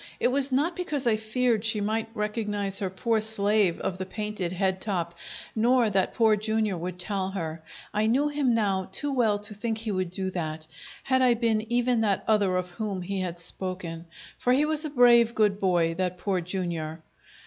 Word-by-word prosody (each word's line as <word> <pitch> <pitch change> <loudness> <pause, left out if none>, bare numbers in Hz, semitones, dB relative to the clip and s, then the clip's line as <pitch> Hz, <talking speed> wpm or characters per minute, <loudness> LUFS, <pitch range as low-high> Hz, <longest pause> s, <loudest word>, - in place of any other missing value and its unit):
It - - +2
was 275 +1 +3
not 300 +7 +1
because 305 -7 0
I 230 -2 +4
feared 220 +1 0
she 220 -1 +2
might 220 +2 -1
recognize 210 -2 -1
her 195 - -2
poor 220 +4 0
slave 210 -4 +2
of 185 - -3
the 190 - -3
painted 210 -3 -3
head 190 0 -1
top, 175 -5 -2 0.4
nor 235 0 +3
that 190 -1 +1
Poor 220 -2 +4
Jr. 215 -1 0
would 180 +1 -5
tell 190 +1 -2
her. 165 -4 -5 0.3
I 215 +1 +1
knew 270 +6 +2
him 285 -5 +1
now 195 -4 0
too 280 +9 +1
well 225 -5 +2
to 210 +1 -3
think 220 +2 -3
he 220 -1 -3
would 185 -2 -1
do 190 +1 -3
that, 155 -3 -4 0.4
had 260 -1 +2
I 250 -2 +4
been 225 -1 0
even 240 -1 +2
that 205 -3 +1
other 200 -4 +2
of 180 0 -3
whom 195 -1 -4
he 195 +2 -3
had 175 -2 -3
spoken, 175 -1 -3 0.3
for 250 - +2
he 285 +4 +3
was 310 0 0
a - - -2
brave, 240 -3 +5
good 205 -2 +2
boy, 175 -4 +2
that 180 +1 -2
Poor 185 -1 -1
Jr. 170 -3 -3
210 Hz, 195 wpm, -26 LUFS, 185-230 Hz, 0.4 s, brave